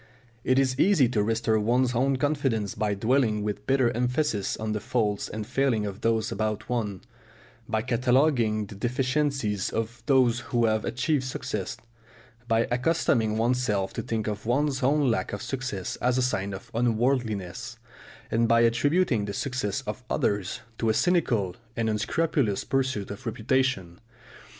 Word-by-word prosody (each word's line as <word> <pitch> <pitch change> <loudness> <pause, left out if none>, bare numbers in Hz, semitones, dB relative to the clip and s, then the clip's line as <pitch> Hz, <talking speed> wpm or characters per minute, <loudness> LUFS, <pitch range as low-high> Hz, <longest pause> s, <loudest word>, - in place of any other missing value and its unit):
It 130 - +2
is 130 -1 +2
easy 175 -9 +5
to 115 -4 +1
restore 110 +1 +1
one's 125 +4 +2
own 135 +3 +2
confidence 130 -8 0
by 105 -1 -1
dwelling 110 0 +1
with 105 0 -4
bitter 130 -3 +3
emphasis 125 -3 0
on 110 0 -3
the 105 - -1
faults 110 -3 -1
and 110 0 -5
failings 130 -3 +1
of 100 0 -6
those 110 -1 +1
about 110 +1 -2
one, 105 -6 -2 0.7
by 110 0 0
cataloguing 120 -3 +2
the 100 - -11
deficiencies 125 -1 0
of 115 +2 -3
those 130 -3 +4
who 120 -2 0
have 110 -1 +1
achieved 130 +3 0
success, 105 -6 -4 0.7
by 115 0 +2
accustoming 120 -5 +1
oneself 115 -4 0
to - - -3
think 110 -2 -2
of 105 0 -4
one's 140 +2 +1
own 140 0 +3
lack 115 - -2
of 100 - -4
success 125 -8 -4
as 125 0 +1
a 130 - +2
sign 100 -6 -1
of 95 - -11
unworldliness, 120 -2 -1 0.5
and 115 +1 +2
by 115 0 +4
attributing 120 - +2
the 100 - -4
success 125 -4 -2
of 105 +4 -6
others 100 -3 -1 0.2
to 115 - +1
a 110 - +2
cynical 120 - +1 0.2
and 115 -1 0
unscrupulous 110 +1 0
pursuit 130 -7 -1
of 105 +5 -8
reputation. 110 -6 0
115 Hz, 155 wpm, -27 LUFS, 105-130 Hz, 0.7 s, easy